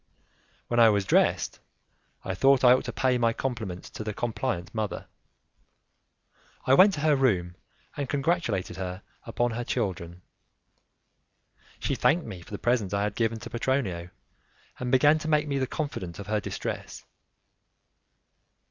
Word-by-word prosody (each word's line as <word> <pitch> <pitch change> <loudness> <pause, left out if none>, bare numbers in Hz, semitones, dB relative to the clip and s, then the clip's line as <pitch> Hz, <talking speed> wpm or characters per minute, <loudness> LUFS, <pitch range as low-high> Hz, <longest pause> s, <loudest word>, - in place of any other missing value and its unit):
When 120 - +1
I 115 -1 +8
was 100 -2 +1
dressed, - - +2 0.7
I 95 - -2
thought 135 +6 +4
I 125 -1 +8
ought 130 - +1
to - - -3
pay 130 -2 +1
my 115 -1 +2
compliments 110 -9 -4
to - - -6
the 105 -1 -4
compliant 115 -6 -3
mother. 110 -2 -3 1.6
I 130 - +4
went 190 +7 +7
to 145 - -5
her 155 -1 +4
room, 95 -10 +1 0.4
and 140 -3 -4
congratulated 140 - -1
her 95 0 -5 0.2
upon 120 +1 -1
her 120 +2 -3
children. 90 -7 -3 1.6
She - - -1
thanked 165 +2 +2
me 95 -6 -8
for - - -15
the 105 - -5
present 110 -5 0
I 100 - +1
had 105 -1 -1
given 115 0 0
to - - -7
Petronio, 115 -9 -1 0.7
and 125 -1 -3
began 145 +4 +5
to 155 - -6
make 150 -1 +2
me 140 -1 -1
the 130 - 0
confidant 110 - -4
of 100 - -7
her 105 +1 0
distress. - - -6
115 Hz, 155 wpm, -27 LUFS, 95-135 Hz, 1.6 s, I